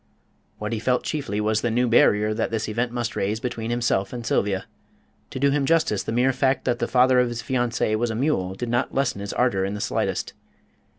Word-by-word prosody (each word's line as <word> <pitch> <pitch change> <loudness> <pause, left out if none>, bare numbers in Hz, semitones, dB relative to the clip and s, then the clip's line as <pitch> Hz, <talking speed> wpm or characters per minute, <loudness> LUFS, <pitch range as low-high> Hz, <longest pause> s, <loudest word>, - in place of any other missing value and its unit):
What 105 +2 -4
he 110 - -1
felt 125 +2 +1
chiefly 135 -10 -3
was 110 0 +1
the 120 - 0
new 120 +2 +1
barrier 105 -2 +4
that 110 +1 -1
this 110 -1 -2
event 115 +3 -1
must 120 -1 -3
raise 105 +3 -1
between 115 -2 -4
himself 120 -5 0
and 120 -2 -6
Sylvia; 100 -3 0 0.6
to - - -6
do 140 +1 +3
him 145 0 +1
justice, 155 -8 +2
the - - -4
mere 125 +3 +2
fact 130 +1 +1
that 120 -1 0
the - - 0
father 125 0 +4
of 125 - +3
his 120 -1 -5
fiancée 120 -4 0
was 120 +2 0
a 110 - -3
mule 105 -8 0
did 120 +4 -4
not 120 +1 -1
lessen 135 -7 0
his 100 - -4
ardour 120 -6 +1
in 100 +2 -2
the - - -5
slightest. - - -2
120 Hz, 225 wpm, -24 LUFS, 105-125 Hz, 0.6 s, barrier